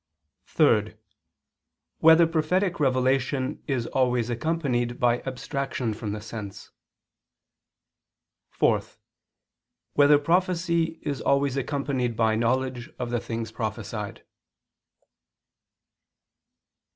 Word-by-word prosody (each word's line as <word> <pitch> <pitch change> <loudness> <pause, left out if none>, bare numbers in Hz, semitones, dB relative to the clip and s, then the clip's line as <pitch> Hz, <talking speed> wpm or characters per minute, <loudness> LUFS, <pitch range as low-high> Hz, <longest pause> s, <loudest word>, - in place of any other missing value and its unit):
(3) - - +2 1.0
Whether 160 +1 +7
prophetic 170 +3 0
revelation 130 0 +1
is 130 -5 -1
always 125 -2 0
accompanied 120 -3 -1
by 120 0 +2
abstraction 130 -2 -3
from 105 -1 -5
the 105 - -4
sense? 105 -2 -8 1.8
(4) - - +2 1.1
Whether 145 0 +6
prophecy 170 +1 +1
is 145 -3 -3
always 140 -1 +1
accompanied 135 -3 -2
by 110 -1 +3
knowledge 125 +2 -1
of 120 -1 -4
the 120 - 0
things 115 -1 -5
prophesied? 110 -2 -5
130 Hz, 85 wpm, -26 LUFS, 115-145 Hz, 1.8 s, Whether